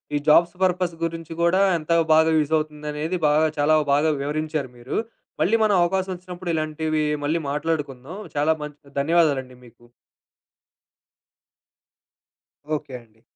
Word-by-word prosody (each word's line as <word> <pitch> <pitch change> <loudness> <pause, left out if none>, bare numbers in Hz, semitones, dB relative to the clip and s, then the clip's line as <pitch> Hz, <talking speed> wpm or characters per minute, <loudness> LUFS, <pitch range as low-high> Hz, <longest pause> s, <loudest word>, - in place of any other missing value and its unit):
ఈ - - +3
jobs 170 +3 +5
purpose 180 -2 +1
గురించి 165 -1 -4
గూడా 170 +3 +3 0.2
ఎంత 155 0 -6 0.2
బాగా 160 +1 +5
యూజ్ 155 0 0
అవుతుందనేది 150 +2 -3
బాగా 150 +2 +3
చాలా 150 +2 +4 0.2
బాగా 150 +3 +3
వివరించారు 150 -1 -3
మీరు. 120 +4 -5 0.4
మళ్ళీ 210 +6 +3
మనం 210 -2 +3
అవకాశం 190 +2 -1
వచ్చినప్పుడు 180 0 -8
ఇలాంటివి 155 0 -1 0.2
మళ్ళీ 160 +3 0
మాట్లాడుకుందాం. 150 0 -3 0.2
చాలా 150 +2 +3
మంచి 145 -1 -11
ధన్యవాదాలండి 140 -4 +1
మీకు. 120 0 -20 2.9
ఓకే 145 -3 -7
అండి. 110 -1 -28
155 Hz, 120 wpm, -23 LUFS, 145-170 Hz, 2.9 s, jobs